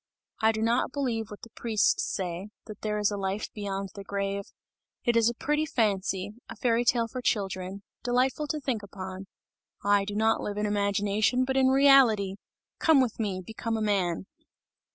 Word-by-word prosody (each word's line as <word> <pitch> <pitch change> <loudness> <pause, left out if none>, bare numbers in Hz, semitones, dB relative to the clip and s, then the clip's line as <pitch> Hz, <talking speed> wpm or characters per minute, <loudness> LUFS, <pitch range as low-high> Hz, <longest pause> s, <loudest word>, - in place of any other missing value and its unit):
I 220 0 +5
do 220 0 -2
not 235 +3 +1
believe 235 -6 -2
what 205 - -11
the 230 - -11
priests 220 -2 +1
say, 185 +1 -4 0.2
that 215 -2 -10
there 210 -1 -1
is 210 0 +2
a 205 - -2
life 195 +2 -3
beyond 195 -2 -4
the 200 - -8
grave! 200 0 -2 0.6
It 240 - +2
is 230 0 +5
a 235 - -4
pretty 300 +5 0
fancy, 200 -5 0 0.2
a - - -7
fairy 235 -1 +2
tale 235 -1 +2
for 250 +3 -6
children, 195 -3 -2 0.2
delightful 255 +4 +1
to 305 - -2
think 260 -6 -2
upon. 190 -1 -8 0.6
I 205 -1 +3
do 205 0 -5
not 220 +1 +2
live 205 0 -4
in 210 - 0
imagination, 205 +4 +1
but 265 0 -1
in 265 -1 +4
reality! 260 -8 +5 0.4
Come 320 -3 +5
with 245 -4 0
me! 195 -4 -2
Become 225 +1 -3
a - - -2
man!" 190 -4 0
210 Hz, 180 wpm, -28 LUFS, 200-240 Hz, 0.6 s, I